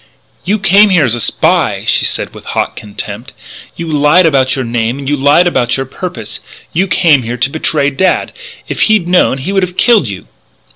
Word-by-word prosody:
"You 205 Hz, +4 st, +1 dB
came 200 Hz, +1 st, +4 dB
here 175 Hz, -6 st, +3 dB
as 120 Hz, -, 0 dB
a 120 Hz, -, -3 dB
spy," -, -, 0 dB
she -, -, +1 dB
said -, -, -2 dB
with -, -, -12 dB
hot -, -, -3 dB
contempt. 105 Hz, +2 st, -8 dB, 0.4 s
"You 170 Hz, -, -6 dB
lied 150 Hz, +4 st, +3 dB
about 135 Hz, -4 st, +2 dB
your 130 Hz, -2 st, -3 dB
name; 115 Hz, +1 st, -2 dB
you 145 Hz, +2 st, 0 dB
lied 145 Hz, +5 st, +3 dB
about 125 Hz, -8 st, 0 dB
your 135 Hz, -, -3 dB
purpose. 180 Hz, +7 st, -7 dB, 0.3 s
You 185 Hz, +4 st, +1 dB
came 165 Hz, -7 st, +3 dB
here 120 Hz, +1 st, -5 dB
to 135 Hz, +3 st, 0 dB
betray 150 Hz, -2 st, 0 dB
Dad! 190 Hz, +7 st, 0 dB, 0.3 s
If -, -, -4 dB
he'd 215 Hz, -5 st, +2 dB
known 180 Hz, -7 st, +2 dB
it -, -, -8 dB
he 190 Hz, -, -3 dB
would 195 Hz, -, +2 dB
have 180 Hz, 0 st, -4 dB
killed 225 Hz, -, +3 dB
you!" 95 Hz, -3 st, -7 dB
145 Hz, 200 wpm, -12 LUFS, 125-180 Hz, 0.4 s, came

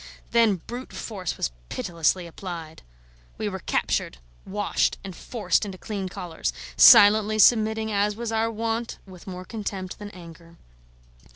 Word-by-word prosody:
Then 230 Hz, -4 st, +4 dB
brute 245 Hz, +2 st, -7 dB
force 190 Hz, -7 st, -5 dB
was -, -, -1 dB, 0.2 s
pitilessly 170 Hz, +1 st, 0 dB
applied. 170 Hz, -2 st, -8 dB, 0.6 s
We -, -, -2 dB
were -, -, -4 dB
captured, 60 Hz, -, -1 dB, 0.3 s
washed, 205 Hz, +1 st, 0 dB
and 190 Hz, -2 st, -7 dB
forced 225 Hz, +3 st, 0 dB
into 195 Hz, -3 st, -6 dB
clean 195 Hz, -1 st, -5 dB
collars: 165 Hz, -, -4 dB, 0.2 s
silently 215 Hz, -, +8 dB
submitting, 220 Hz, 0 st, +4 dB
as 205 Hz, 0 st, +1 dB
was 230 Hz, 0 st, -4 dB
our 225 Hz, 0 st, +1 dB
wont, 230 Hz, +1 st, -3 dB
with 185 Hz, -2 st, -14 dB
more 185 Hz, -1 st, -7 dB
contempt 200 Hz, -4 st, -5 dB
than 205 Hz, -1 st, -7 dB
anger. 170 Hz, -2 st, -13 dB
205 Hz, 135 wpm, -25 LUFS, 180-220 Hz, 0.6 s, silently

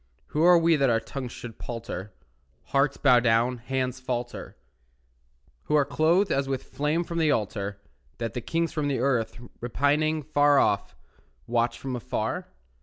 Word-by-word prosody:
Who 150 Hz, -, -1 dB
are 175 Hz, +1 st, +7 dB
we 165 Hz, -1 st, +4 dB
that 135 Hz, -2 st, +3 dB
our 115 Hz, -1 st, +3 dB
tongues 125 Hz, +2 st, -6 dB
should 120 Hz, -3 st, -9 dB
palter, 115 Hz, -4 st, -6 dB, 0.5 s
Hearts 140 Hz, 0 st, +1 dB
bow 125 Hz, -3 st, +5 dB
down, 120 Hz, +1 st, +2 dB
hands 130 Hz, +1 st, -2 dB
falter, 125 Hz, -, -5 dB, 1.1 s
Who 150 Hz, -, +1 dB
are 145 Hz, -2 st, +4 dB
clothed 165 Hz, +6 st, +2 dB
as 135 Hz, 0 st, +1 dB
with 135 Hz, -1 st, -2 dB
flame 150 Hz, +4 st, -1 dB
from 170 Hz, 0 st, -4 dB
the 160 Hz, -2 st, +3 dB
altar, 100 Hz, -4 st, -1 dB, 0.4 s
That 115 Hz, -2 st, -3 dB
the 125 Hz, -, -3 dB
kings 165 Hz, +6 st, -1 dB
of 150 Hz, -2 st, 0 dB
the 140 Hz, -2 st, 0 dB
earth, 125 Hz, -3 st, 0 dB, 0.2 s
repining, 145 Hz, +5 st, +1 dB
Far 145 Hz, -1 st, +3 dB
off, 100 Hz, -5 st, +1 dB, 0.5 s
watch 120 Hz, 0 st, 0 dB
from 130 Hz, -2 st, -4 dB
afar? 120 Hz, -, -3 dB
135 Hz, 160 wpm, -26 LUFS, 120-150 Hz, 1.1 s, are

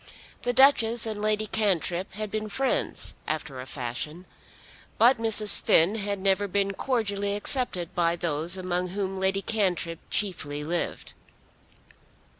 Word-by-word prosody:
The 245 Hz, -, -1 dB
Duchess 240 Hz, -3 st, +4 dB
and 215 Hz, -2 st, -4 dB
Lady 215 Hz, 0 st, 0 dB
Cantrip 190 Hz, -4 st, -1 dB
had 210 Hz, 0 st, -5 dB
been 215 Hz, 0 st, -4 dB
friends, 265 Hz, +5 st, -2 dB
after 150 Hz, -4 st, -4 dB
a 130 Hz, -, -10 dB
fashion. 135 Hz, +7 st, -5 dB, 0.7 s
But 240 Hz, +2 st, +4 dB
Mrs. 220 Hz, -2 st, +6 dB
Finn 170 Hz, +6 st, +4 dB
had 205 Hz, -2 st, -3 dB
never 195 Hz, +1 st, 0 dB
been 200 Hz, +1 st, -1 dB
cordially 205 Hz, -4 st, -2 dB
accepted 205 Hz, -6 st, -1 dB
by 170 Hz, -1 st, +1 dB
those 170 Hz, +1 st, +1 dB
among 180 Hz, -1 st, -2 dB
whom 190 Hz, 0 st, -4 dB
Lady 190 Hz, +1 st, 0 dB
Cantrip 180 Hz, -6 st, -1 dB
chiefly 150 Hz, -8 st, -2 dB
lived. 170 Hz, +3 st, -4 dB
195 Hz, 130 wpm, -26 LUFS, 175-215 Hz, 0.7 s, Mrs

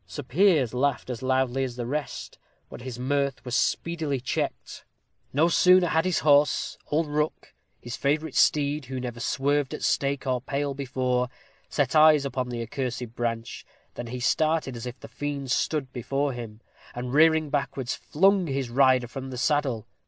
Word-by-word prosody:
Sir 85 Hz, -, -6 dB
Piers 155 Hz, -, +3 dB
laughed 130 Hz, 0 st, 0 dB
as 120 Hz, -, -6 dB
loudly 130 Hz, 0 st, +1 dB
as 125 Hz, -2 st, -4 dB
the 120 Hz, -1 st, -4 dB
rest, 145 Hz, +4 st, -5 dB, 0.3 s
but -, -, -9 dB
his 125 Hz, -1 st, -6 dB
mirth 140 Hz, +1 st, -1 dB
was 125 Hz, -1 st, -2 dB
speedily 160 Hz, -4 st, 0 dB
checked. 125 Hz, -, -4 dB, 0.5 s
No 155 Hz, +5 st, +3 dB
sooner 180 Hz, +1 st, +5 dB
had 160 Hz, +1 st, +2 dB
his 185 Hz, -2 st, +1 dB
horse 145 Hz, 0 st, +3 dB
old 160 Hz, +2 st, +1 dB
Rook, 150 Hz, +1 st, -2 dB, 0.3 s
his 120 Hz, -1 st, -6 dB
favorite 150 Hz, +1 st, 0 dB
steed, 145 Hz, -1 st, +2 dB
who 130 Hz, +1 st, -5 dB
never 120 Hz, -2 st, -5 dB
swerved 140 Hz, +3 st, 0 dB
at -, -, -8 dB
stake 140 Hz, 0 st, 0 dB
or 130 Hz, -2 st, 0 dB
pale 140 Hz, +1 st, -2 dB
before 125 Hz, -2 st, -1 dB, 0.4 s
set -, -, 0 dB
eyes 155 Hz, -2 st, +6 dB
upon 130 Hz, -2 st, -2 dB
the 120 Hz, -1 st, -3 dB
accursed 125 Hz, -1 st, -4 dB
branch, 115 Hz, -1 st, -3 dB, 0.3 s
than 120 Hz, -, -6 dB
he 125 Hz, +2 st, -5 dB
started 155 Hz, +1 st, +1 dB
as 115 Hz, +1 st, -6 dB
if 125 Hz, +2 st, -8 dB
the -, -, -10 dB
fiend 140 Hz, -2 st, -4 dB
stood 140 Hz, 0 st, 0 dB
before 135 Hz, +3 st, -1 dB
him, 115 Hz, -2 st, -8 dB, 0.3 s
and, 125 Hz, +1 st, -4 dB
rearing 160 Hz, 0 st, +4 dB
backwards, 135 Hz, -3 st, -2 dB
flung 190 Hz, +2 st, +2 dB
his 135 Hz, -3 st, -2 dB
rider 130 Hz, -1 st, +4 dB
from 135 Hz, +2 st, -7 dB
the 130 Hz, -, -6 dB
saddle. 130 Hz, -5 st, 0 dB
135 Hz, 170 wpm, -26 LUFS, 125-150 Hz, 0.5 s, eyes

